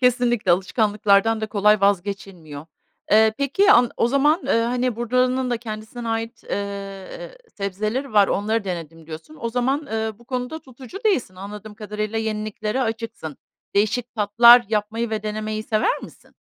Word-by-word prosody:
Kesinlikle, 245 -5 +2
alışkanlıklardan 205 +3 +2
da 220 - -2
kolay 210 0 +3
vazgeçilmiyor. 190 -6 -2 0.4
Eee, 220 +1 +5
peki, 390 +10 +4
an 245 - +5
o 230 - +2
zaman, 295 +6 +2
eee, - - +1
hani, 245 +1 0
buranın 250 +2 0
da 240 - +1
kendisine 225 +1 -7
ait, 225 +1 -4
eee, 200 - -6 0.2
sebzeleri 215 +7 -3
var, 205 -2 +5
onları 215 +2 0
denedim 165 -3 -6
diyorsun. 165 - -10
O 230 - -2
zaman, 260 +5 -1
eee, 220 0 -2
bu 240 - -19
konuda 250 +4 -4
tutucu 260 +4 -11
değilsin, 275 - +1
anladığım 210 +3 -9
kadarıyla, 215 +1 -4
yeniliklere 215 +1 -3
açıksın. 225 - -5 0.4
Değişik 215 +4 0
tatlar 235 +3 +7
yapmayı 220 +2 -1
ve 215 -1 -2
denemeyi 215 0 -3
sever 215 0 0
misin? - - -14
220 Hz, 145 wpm, -22 LUFS, 205-245 Hz, 0.4 s, tatlar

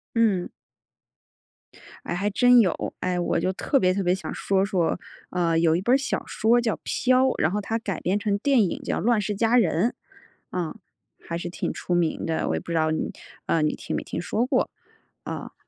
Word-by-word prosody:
嗯。 210 -6 +2 1.6
哎， - - -2
还 200 +4 0
真 245 +4 +6
有。 185 -6 0
哎， 180 -1 -1
我 175 - 0
就 185 - 0
特 275 +8 +1
别 185 -6 +3
特 195 +1 -1
别 180 0 +2
想 190 - -5
说 195 -1 +1
说 180 -4 0 0.3
啊， 175 -2 0
呃， 165 - +2
有 165 -1 +3
一 - - -1
本 240 +6 +3
儿 - - +7
小 275 - -2
说 230 +3 +2
叫 230 -3 0
《飘》， 255 0 +2 0.2
然 155 - +3
后 205 +3 -1
它 225 +2 -2
改 200 -6 -4
编 190 +3 0
成 205 -1 0
电 265 +1 +3
影 185 - -2
叫 - - -2
《乱 235 -1 +2
世 205 +1 -2
佳 225 +4 +2
人》。 185 -2 +3 0.6
啊， 175 -3 -3 0.5
还 170 - -5
是 175 - -4
挺 175 - -3
出 180 - -3
名 170 -2 0
的， 165 -1 -1
我 - - 0
也 - - -2
不 170 - -7
知 - - -2
道 155 0 +2
你 160 - -2 0.3
呃， 165 - +2
你 150 - +1
听 - - -5
没 - - -1
听 - - -5
说 215 +6 0
过， 255 -1 +1 0.6
啊。 - - -6
195 Hz, 225 characters per minute, -25 LUFS, 175-225 Hz, 1.6 s, 儿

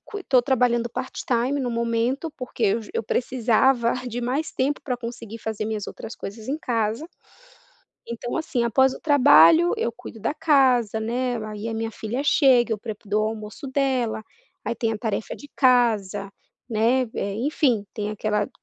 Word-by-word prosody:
estou 270 -11 +2
trabalhando 240 -3 +1
part 255 +2 -5
time, 255 +4 +1
no 250 -2 -1
momento, 235 +6 -1
porque 230 -4 -1
ju 210 - -13
eu - - -1
precisava 240 +1 +2
de 245 +1 -4
mais 265 +6 -2
tempo 280 +3 -1
pra 250 -3 -2
conseguir 230 -2 -7
fazer 220 -1 -4
minhas 215 -2 -3
outras 225 - -8
coisas 215 +3 -8
em 290 +3 -1
casa, 230 +1 -1 1.1
então, 235 +4 -4
assim, 255 -7 -1
após 265 +3 +3
o - - -11
trabalho 170 - +6
eu 235 - -1
cuido 225 - -11
da 225 +7 -1
casa, 260 -9 +3
né, 245 +2 -1
aí 215 +1 -6
a 225 - -3
minha 225 0 -3
filha 230 +5 -4
chega, 250 -6 +4
eu 215 - -2
prep 215 -2 -8
dou 215 +1 +1
almoço 215 +4 -7
dela, 260 -5 0 0.4
aí - - -2
tem 225 0 -1
a 215 - -4
tarefa 220 -2 -3
de 290 - -13
casa, 230 -7 +2 0.4
né, 235 +4 +2
eh, 200 0 -2
enfim. 250 -4 +1
Tem 210 -1 -3
aquela 210 -1 -1
235 Hz, 170 wpm, -24 LUFS, 220-260 Hz, 1.1 s, trabalho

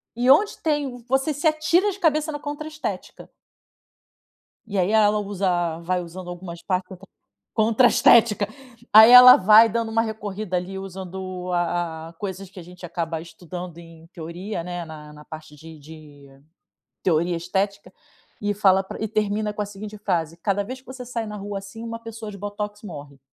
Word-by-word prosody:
e 245 +2 +1
onde 405 +10 +5
tem 295 -5 -1
você 270 +4 +1
se 290 +3 0
atira 325 +6 +2
de 395 - -10
cabeça 310 -2 +1
na 295 - -5
contra 295 +1 -6
estética. 310 0 -7 1.4
E 200 -2 -4
aí 185 +3 +1
ela 210 -1 +4
usa, 180 -5 -1
vai 180 +1 -1
usando 175 +1 -9
algumas 175 -1 -8
partes 185 -1 -2
contra 185 -2 -12 0.5
contra 225 +2 +3
a - - +3
estética. 215 -3 +4 0.5
Aí 220 +2 +10
ela 250 0 +11
vai 215 +4 +7
dando 230 0 -2
um 225 - +1
recorrida 210 -3 -4
ali, 190 +2 -3
usando 185 -1 -7
a 170 -2 -2
a - - -16
coisas 190 +1 -7
que 195 - -12
a - - -9
gente 180 +1 -11
acaba 165 -2 -4
estudando 175 +1 -9
em 165 -1 -14
teoria, 170 +2 -6
né, 175 -1 -5
na 150 -1 -11
na 150 0 -14
parte 155 -1 -11
de 160 +1 -13
de 150 -2 -14 0.8
teoria 170 0 +1
estética 195 +4 -3 0.5
e 205 0 0
fala 195 -2 +3
pra - - -9
e 220 - -1
termina 210 0 -1
com 210 - -4
a 205 - -1
seguinte 205 +1 -9
frase: 170 -5 -2
"Cada 200 +3 -1
vez 255 +5 -7
que 260 - -36
você 260 -1 -8
sai 230 -2 -4
na 210 0 -7
rua 200 0 -5
assim, 200 +4 -10
uma 230 0 -6
pessoa 225 -2 -8
de 200 - -10
botox 205 +1 -6
morre". 145 -7 -10
195 Hz, 185 wpm, -23 LUFS, 175-220 Hz, 1.4 s, ela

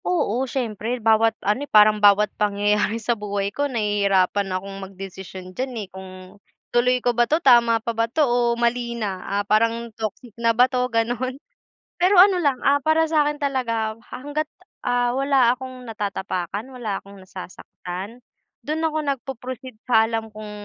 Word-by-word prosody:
Oo, 265 - 0
siyempre 235 -2 -3
bawat 225 0 +3
ano 230 +9 0
parang 210 0 +5
bawat 205 0 +5
pangyayari 205 +1 +1
sa 230 +1 0
buhay 205 -2 -3
ko 285 0 -1
nahihirapan 200 -4 +1
akong 195 +1 -4
magdesisyon 190 -1 -9
diyan, 260 +5 -3
eh, - - -22
kung 190 0 -9 0.6
tuloy 250 +1 +3
ko 245 - +3
ba 240 0 +2
'to, 310 - +3
tama 240 -7 +5
pa 235 - -1
ba 230 0 0
'to 305 +5 +2
o 240 -1 +1
mali 235 0 0
na, 195 -5 -3
ah, 200 +2 -2
parang 230 +2 +1
toxic 220 +1 -6
na 230 -1 +2
ba 250 - +7
'to, 250 -1 -1
ganon? 245 +3 -1 0.6
Pero 365 +3 +4
ano 370 0 +7
lang, 285 -6 +2
ah, 280 +1 +4
para 315 +3 +2
sa'kin 300 -2 +1
talaga 230 -6 -2 0.2
hangga't, 290 +4 -3 0.4
ah, 245 0 +2
wala 270 -2 +3
akong 255 -1 -8
natatapakan, 205 0 -4
wala 225 -6 -4
akong 200 0 -14
nasasaktan, 185 +3 -9 0.4
do'n 305 +5 -2
ako 320 -1 0
nagpo-proceed 260 -3 -5
sa 225 -3 +4
alam 225 -1 -3
kung, 215 0 -9
230 Hz, 160 wpm, -23 LUFS, 205-255 Hz, 0.6 s, ba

